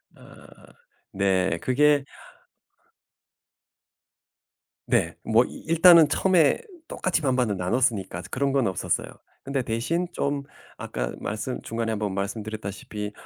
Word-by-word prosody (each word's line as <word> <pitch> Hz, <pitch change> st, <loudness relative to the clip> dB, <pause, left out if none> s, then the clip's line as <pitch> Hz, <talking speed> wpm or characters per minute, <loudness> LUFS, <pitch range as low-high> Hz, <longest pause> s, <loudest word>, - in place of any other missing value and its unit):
아 -, -, -16 dB, 0.7 s
네, 95 Hz, -3 st, +1 dB
그게 145 Hz, +2 st, +3 dB, 2.8 s
네. -, -, +1 dB
뭐 115 Hz, +2 st, +4 dB
이 -, -, -10 dB
일단은 165 Hz, -1 st, +7 dB
처음에 180 Hz, -5 st, +3 dB, 0.3 s
똑같이 185 Hz, -3 st, -1 dB
반반을 125 Hz, -7 st, +1 dB
나눴으니까 100 Hz, -1 st, 0 dB
이제 90 Hz, -, -9 dB
그런 140 Hz, +1 st, 0 dB
건 135 Hz, -5 st, +2 dB
없었어요. 95 Hz, -, -1 dB, 0.4 s
근데 135 Hz, -1 st, -2 dB
대신 125 Hz, +11 st, -1 dB
좀 140 Hz, 0 st, -1 dB, 0.3 s
아까 -, -, -4 dB
말씀 110 Hz, +5 st, -4 dB
중간에 115 Hz, 0 st, -3 dB
1 105 Hz, -, -3 dB
번 105 Hz, -3 st, -2 dB
말씀드렸다시피 105 Hz, 0 st, -5 dB
115 Hz, 240 characters per minute, -25 LUFS, 100-140 Hz, 2.8 s, 일단은